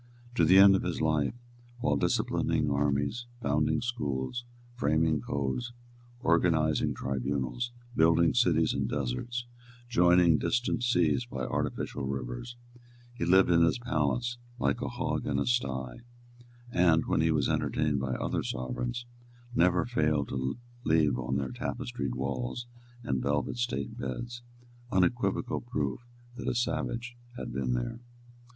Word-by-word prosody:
To - - +3
the 95 - +6
end 100 0 +9
of 95 - +1
his 90 - -2
life, 80 +4 +1 0.4
while 75 -11 +1
disciplining 70 +1 +1
armies, 70 - 0
founding 75 -2 +1
schools, 115 - -3 0.3
framing 80 -6 +1
codes, 70 - -2 0.5
organising 80 -6 +2
tribunals, 70 - -2 0.2
building 85 0 +4
cities - - +3
in - - -1
deserts, 75 - -3 0.4
joining 90 -6 +5
distant 120 0 0
seas 80 - +2
by - - -5
artificial 70 -2 -2
rivers, 65 - -5 0.6
he 115 -8 -3
lived 95 +1 +5
in 85 -1 +5
his 85 +5 +4
palace 120 0 -1 0.2
like - - 0
a - - -1
hog - - -2
in 70 -2 0
a 70 - +1
sty; 65 0 -1 0.7
and, 85 -5 +4
when - - +1
he 80 - +3
was 75 -4 +2
entertained 75 -2 0
by 65 -1 -2
other - - -1
sovereigns, 120 - -3 0.5
never 90 -2 +3
failed 75 - +1
to 65 - -2 0.3
leave 75 - +3
on 65 +1 -2
their 70 -2 -1
tapestried - - -4
walls 65 - -3 0.4
and 65 - -1
velvet 75 - -1
state 120 - -2
beds 120 - -5 0.5
unequivocal 120 +6 +1
proof 120 +1 -2 0.4
that 120 - -5
a - - 0
savage 120 0 -2 0.2
had - - -5
been 65 -2 -1
there. - - -2
80 Hz, 135 wpm, -30 LUFS, -, 0.7 s, end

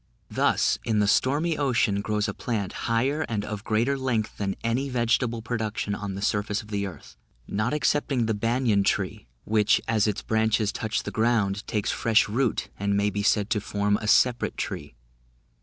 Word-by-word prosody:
Thus, - - +2
in 110 -2 0
the 105 -1 +3
stormy 150 +9 +2
ocean, 120 -7 +1
grows 105 +1 -1
a 100 - -3
plant, 105 -5 -3 0.2
higher 130 +7 +1
and 105 -3 -2
of 105 -1 -5
greater 115 +6 +1
length 120 -5 -1
than 100 -1 -1
any 125 +4 0
vegetable 120 -1 0
production 110 -3 -2
of 100 -2 -4
the 100 - -5
surface 105 +1 0
of 105 - -16
the 100 -1 -2
earth, 90 - -11 0.3
not 105 +3 -1
excepting 145 -4 +1
the 110 - 0
banyan 115 -1 +1
tree, - - -1 0.2
which, 105 0 +3
as 110 -2 +2
its 105 0 -2
branches 110 -1 +1
touch 110 -1 -2
the - - -5
ground, 110 -3 +1
takes 105 -1 -1
fresh 115 -2 +3
root, 120 +2 0
and 100 0 +1
may 100 0 +1
be 105 - -2
said 105 0 +1
to 105 - +1
form 105 0 0
a 105 - -5
separate 120 +2 +3
tree. - - -5
110 Hz, 180 wpm, -26 LUFS, 105-120 Hz, 0.3 s, the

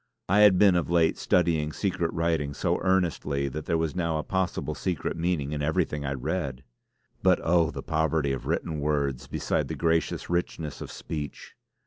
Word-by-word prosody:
I 100 +3 +3
had 105 -3 +7
been 100 -1 +6
of 85 - 0
late 85 -2 +3
studying 80 -4 +2
secret 85 -2 -1
writing 80 -4 -1
so - - 0
earnestly 85 -7 +1
that 75 +3 -6
there 85 - +2
was 80 -1 -1
now 85 -3 0
a 75 - -2
possible 95 -2 -1
secret 90 -5 -2
meaning 80 -4 -1
in 75 -1 -2
everything 75 -2 0
I 70 - -1
read. 70 -1 -3 0.6
But - - +4
oh! 85 -1 +3
the - - -6
poverty 80 -2 +1
of 65 - -4
written 80 -3 -1
words 70 -3 -1
beside - - -1
the - - -4
gracious 80 -1 0
richness 85 -3 -2
of - - -6
speech! 75 -2 -6
80 Hz, 175 wpm, -27 LUFS, 75-85 Hz, 0.6 s, had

